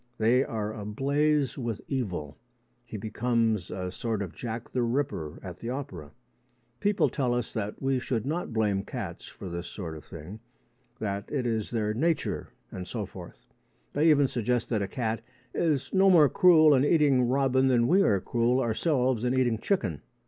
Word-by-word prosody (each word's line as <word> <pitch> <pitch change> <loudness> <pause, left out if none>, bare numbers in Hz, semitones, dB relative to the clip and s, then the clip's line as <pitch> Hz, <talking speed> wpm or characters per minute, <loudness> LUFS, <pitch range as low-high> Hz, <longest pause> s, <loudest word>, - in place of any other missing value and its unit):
They 120 +4 +4
are 110 -3 -3
ablaze 140 +7 0
with 115 -4 -3
evil. 90 - -3 0.5
He 115 -2 -7
becomes 110 -2 0
a 90 -1 -4
sort 110 +1 -2
of 90 -4 -7
Jack 115 +4 -6
the 125 - 0
Ripper 120 - -2
at 90 -3 -8
the 115 - -5
opera. 95 - -5 0.7
People 205 0 +2
tell 125 -4 0
us 120 -2 -3
that 105 -1 -4
we 135 -1 +1
should 120 -3 -2
not 160 +2 -2
blame 105 -3 +1
cats - - -6
for 95 - -9
this 85 0 -5
sort 85 -6 -6
of 75 - -10
thing 85 +7 -9 0.6
that 100 -3 -4
it 135 -4 -1
is 110 -3 -1
their 110 -2 -1
nature 160 +8 -1 0.2
and 90 -1 -6
so - - -3
forth. - - -12 0.5
They 155 +3 +4
even 145 -3 +5
suggest 120 0 -1
that 110 -4 0
a 100 - -1
cat 115 0 -2 0.3
is 150 -6 0
no 195 0 +5
more 160 -6 +7
cruel 155 -3 +6
in 130 -1 +4
eating 145 -5 +4
robin 130 0 +3
than 120 -2 +3
we 190 +4 +5
are 100 - +3
cruel 120 +4 +1
ourselves 125 0 +1
in 125 +1 +1
eating 120 -4 +2
chicken. 105 - -1
120 Hz, 175 wpm, -28 LUFS, 105-135 Hz, 0.7 s, more